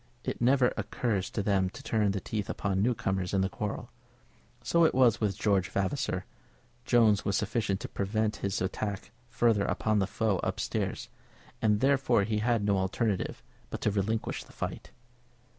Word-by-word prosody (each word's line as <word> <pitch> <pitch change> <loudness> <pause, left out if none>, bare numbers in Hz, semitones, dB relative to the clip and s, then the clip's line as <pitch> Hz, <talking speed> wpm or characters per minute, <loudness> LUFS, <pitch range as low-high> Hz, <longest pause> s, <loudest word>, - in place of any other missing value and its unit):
It - - -4
never 125 0 +4
occurs 105 -6 -1
to 105 - -2
them 95 -2 +2
to - - -11
turn 110 -2 +1
their 100 0 -1
teeth 105 +1 -4
upon 95 -2 -1
newcomers 95 -5 0
in 95 - +3
the 95 - +1
quarrel. 105 +3 -5 0.7
So 170 +5 +3
it 160 - +3
was 125 -4 +4
with 100 -3 0
George 100 -3 +1
Vavasor. 95 -1 -1 0.6
Jones 110 -4 +4
was 100 - +1
sufficient 105 -2 -1
to - - -4
prevent 105 +2 -1
his 100 0 -2 0.7
further 115 -3 +2
attack - - 0
upon 110 -1 +1
the 95 - +1
foe 105 -2 0
up - - -2
stairs, - - -2 0.5
and 105 -2 +2
therefore 135 -5 +3
he 105 +1 -1
had 115 -1 +1
no 100 -2 +2
alternative 95 +1 -1 0.3
but - - -5
to 105 - +2
relinquish 105 +3 -1
the - - -18
fight. - - -5
105 Hz, 170 wpm, -29 LUFS, 100-115 Hz, 0.7 s, never